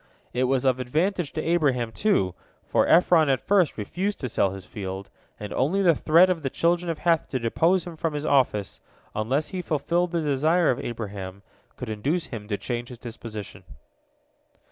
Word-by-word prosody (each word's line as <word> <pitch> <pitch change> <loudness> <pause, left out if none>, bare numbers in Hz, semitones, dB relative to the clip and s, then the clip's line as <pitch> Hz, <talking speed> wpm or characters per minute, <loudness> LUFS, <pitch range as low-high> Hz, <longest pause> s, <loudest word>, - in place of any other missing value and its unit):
It 125 +1 +1
was 130 0 +1
of 130 -1 +3
advantage 160 +6 0
to 155 - -3
Abraham, 135 -9 +1
too, 110 - +1 0.3
for - - +2
Ephron 165 -3 +5
at 135 -2 +2
first 190 -6 +2
refused 185 - -3
to 130 - -2
sell 100 - +2
his 95 -1 -8
field, 95 -1 -6 0.3
and 105 -1 -6
only 180 +10 +1
the 170 -3 +6
threat 165 +4 +5
of 180 -3 -1
the 135 - -2
children 170 +4 +1
of 165 - -2
Heth 165 -1 +1
to 130 - -1
depose 165 +10 +2
him 175 -2 -8
from 160 -1 -2
his 150 +1 -3
office, 115 -9 +1 0.3
unless 130 +8 0
he 185 -2 -4
fulfilled 170 +3 0
the 170 -1 0
desire 155 +4 +2
of 125 - -2
Abraham, 100 -4 -6 0.3
could - - -7
induce 145 +11 -1
him 105 -4 -8
to 105 -2 -2
change 120 +1 -4
his 125 - -9
disposition. 110 -5 -8
140 Hz, 185 wpm, -25 LUFS, 115-170 Hz, 0.3 s, the